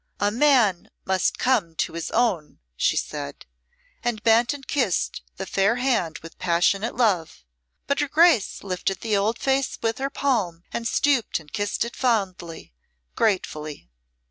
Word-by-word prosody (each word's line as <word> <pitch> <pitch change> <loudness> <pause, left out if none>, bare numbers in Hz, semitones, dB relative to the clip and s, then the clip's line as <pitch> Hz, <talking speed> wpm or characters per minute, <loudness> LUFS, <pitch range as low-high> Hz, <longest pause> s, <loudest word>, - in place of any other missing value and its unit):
"A 205 0 +2
man 235 -7 +3 0.2
must 190 -1 +1
come 210 -11 +1
to - - -1
his 170 -1 -4
own," 210 -11 0 0.2
she - - +1
said, 70 - -5 0.6
and 235 -3 -2
bent 230 +1 +4
and 285 -2 -8
kissed 250 -11 0 0.2
the 190 - -4
fair 195 +4 +2
hand 235 - 0
with 165 - -12
passionate 185 +6 +1
love, 185 - 0 0.4
but 280 - 0
her 290 - +1
Grace 310 - +3
lifted 190 0 -2
the 220 -2 0
old 210 +4 +1
face 270 0 0
with 225 +1 -1
her 275 +1 -1
palm, 210 -13 -1
and 230 - -3
stooped 270 -9 +1
and 150 -2 -17
kissed 205 +2 -1
it 235 - -8
fondly 185 - -2 0.4
gratefully. 155 - -2
215 Hz, 150 wpm, -24 LUFS, 180-245 Hz, 0.6 s, bent